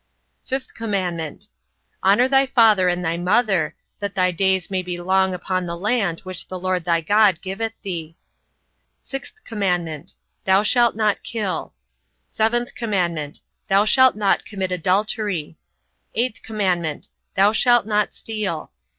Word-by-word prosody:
5th 265 0 -3
commandment: 180 -8 -3 0.6
Honour 205 +7 +5
thy 270 0 +4
father 220 -8 +5
and 180 0 -1
thy 165 +1 0
mother: 190 -1 +1 0.2
that 200 -1 -4
thy 185 -1 +3
days 190 +1 +1
may 190 -1 0
be 180 -1 -5
long 190 +1 +2
upon 185 0 -2
the 170 0 -4
land 200 -3 0
which 185 -2 -5
the 185 - -5
LORD 185 -1 -1
thy 170 -1 +2
God 205 0 +4
giveth 215 +4 -3
thee. 165 -5 -5 0.9
6th 270 - -7
commandment: 180 - -2 0.3
Thou 190 +2 +4
shalt 240 +2 +3
not 215 -2 +1
kill. 210 -5 -4 0.5
7th 240 +2 0
commandment: 175 -11 -2 0.3
Thou 200 +1 +4
shalt 260 +3 +5
not 205 -2 +1
commit 190 -3 -4
adultery. 185 -2 0 0.6
8th 235 -1 -1
commandment: 180 -8 -2 0.3
Thou 200 +2 +5
shalt 240 0 +4
not 210 -1 +1
steal. 205 - -4
195 Hz, 135 wpm, -22 LUFS, 180-220 Hz, 0.9 s, Honour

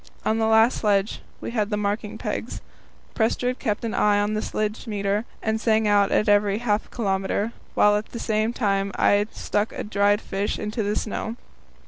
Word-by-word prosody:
On 220 +1 +1
the 220 - +2
last 225 +2 +4
sledge 205 -1 +1 0.2
we - - -4
had 215 -3 0
the 210 - -1
marking 210 +1 -2
pegs. - - -4 0.5
Prestrud 245 +2 0
kept 210 +1 -2
an 225 - -2
eye 205 -1 +3
on 205 +1 0
the 215 - -1
sledge 215 +2 -3
meter, 205 0 -1 0.2
and 220 0 0
sang 220 -2 +2
out 205 -1 +3
at 210 - +2
every 205 -1 +3
half 215 -2 -1
kilometre, 200 0 -1 0.2
while 210 0 +5
at 210 +1 -2
the - - -8
same 220 0 0
time 200 -4 0
I 205 +1 +3
stuck 210 0 -2
a - - -5
dried 205 0 +2
fish 200 -1 -2
into 210 +2 -3
the 205 0 -1
snow. 220 +1 -3
210 Hz, 185 wpm, -24 LUFS, 205-220 Hz, 0.5 s, while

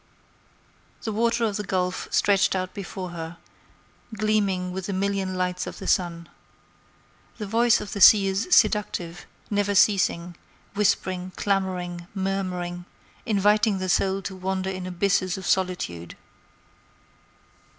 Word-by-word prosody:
The 220 - -2
water 230 +2 +1
of 210 -3 -1
the 210 - -3
Gulf 180 -2 -2
stretched 200 -1 +3
out 185 -1 -3
before 190 -2 -6
her, 165 0 -7 0.8
gleaming 200 -4 0
with 190 0 -5
the 200 - -2
million 195 -1 -1
lights 180 0 -2
of - - -7
the 195 - -8
sun. 170 -4 0 1.1
The 215 - -5
voice 230 +3 +3
of 200 - -7
the 200 - -4
sea 205 -1 +8
is 195 - -1
seductive, 185 - +2 0.2
never 205 0 +1
ceasing, 180 -4 +2 0.4
whispering, 185 -2 0
clamoring, 180 -3 -2
murmuring, 185 -2 -3 0.4
inviting 210 0 +3
the 185 0 -3
soul 190 +2 +1
to 190 - -5
wander 190 0 -2
in 185 -1 -5
abysses 185 0 0
of 190 - -7
solitude. 180 - -1
190 Hz, 130 wpm, -25 LUFS, 180-200 Hz, 1.1 s, sea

